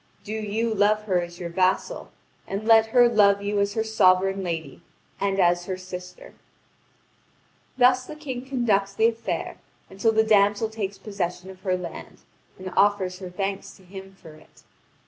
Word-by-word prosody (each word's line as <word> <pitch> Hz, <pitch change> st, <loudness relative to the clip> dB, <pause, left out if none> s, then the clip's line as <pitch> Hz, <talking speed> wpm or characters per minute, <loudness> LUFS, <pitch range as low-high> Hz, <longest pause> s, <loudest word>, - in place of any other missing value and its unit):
Do 210 Hz, -, -8 dB
you 220 Hz, +1 st, -2 dB
love 210 Hz, +1 st, +2 dB
her 185 Hz, -4 st, +1 dB
as 175 Hz, 0 st, -8 dB
your 170 Hz, -1 st, -5 dB
vassal, 190 Hz, -, 0 dB, 0.4 s
and 200 Hz, +2 st, -4 dB
let 225 Hz, -1 st, +6 dB
her 245 Hz, +1 st, +5 dB
love 200 Hz, -3 st, +3 dB
you 205 Hz, 0 st, -1 dB
as 200 Hz, 0 st, 0 dB
her 220 Hz, -, +1 dB
sovereign 195 Hz, -3 st, +2 dB
lady 165 Hz, -3 st, -5 dB, 0.4 s
and 195 Hz, 0 st, -1 dB
as 175 Hz, -1 st, +3 dB
her 185 Hz, -1 st, -3 dB
sister." 180 Hz, -1 st, -10 dB, 1.4 s
Thus 255 Hz, 0 st, +4 dB
the 305 Hz, -, -8 dB
King 265 Hz, -5 st, -6 dB
conducts 215 Hz, -7 st, 0 dB
the 220 Hz, -, +3 dB
affair 230 Hz, 0 st, -4 dB, 0.3 s
until 200 Hz, +4 st, +1 dB
the 220 Hz, 0 st, +3 dB
damsel 205 Hz, 0 st, +3 dB
takes 205 Hz, -3 st, -5 dB
possession 190 Hz, -2 st, -5 dB
of 185 Hz, 0 st, -16 dB
her 185 Hz, -2 st, 0 dB
land, 180 Hz, -, -9 dB, 0.4 s
and 185 Hz, -1 st, -8 dB
offers 195 Hz, -3 st, +2 dB
her 185 Hz, -2 st, -7 dB
thanks 195 Hz, +2 st, -4 dB
to 190 Hz, -, -20 dB
him 190 Hz, +1 st, -11 dB
for 160 Hz, -, -13 dB
it. 155 Hz, -, -20 dB
200 Hz, 165 wpm, -24 LUFS, 185-220 Hz, 1.4 s, let